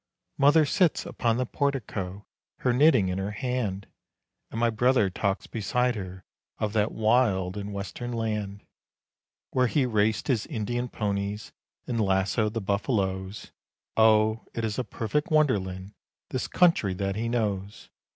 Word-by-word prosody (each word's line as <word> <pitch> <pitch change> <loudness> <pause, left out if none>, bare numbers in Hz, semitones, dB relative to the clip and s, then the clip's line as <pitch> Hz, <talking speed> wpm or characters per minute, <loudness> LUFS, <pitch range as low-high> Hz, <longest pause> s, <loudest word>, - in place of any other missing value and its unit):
Mother 145 +3 +6
sits 180 +1 +2
upon 115 -1 0
the 130 - 0
portico 105 -9 -3 0.4
her 125 - +2
knitting 130 -6 +5
in 90 +1 -2
her 95 +1 -2
hand, 110 -5 -2 0.6
And 115 - -5
my 120 0 +3
brother 115 -3 +3
talks 100 +1 -1
beside 125 +3 0
her 95 -3 -7 0.3
of 105 -1 -2
that 105 -1 +1
wild 110 -5 +2
and 105 0 -5
Western 100 +5 -5
land 105 -3 -3 0.9
Where 130 -1 +3
he 135 +2 +2
raced 110 -3 +1
his 120 -5 0
Indian 120 -1 -2
ponies 100 0 -3 0.3
and 115 -3 -1
lassoed 95 +2 +1
the 115 - -1
buffaloes 100 -1 -2 0.4
Oh, 110 0 +4
it 115 - -1
is 110 +2 -2
a - - 0
perfect 115 - -2
wonderland! 100 - +1 0.4
this - - -2
country 165 - +3
that 95 +1 -2
he 115 +2 -2
knows. 105 -3 -2
110 Hz, 140 wpm, -27 LUFS, 100-125 Hz, 0.9 s, Mother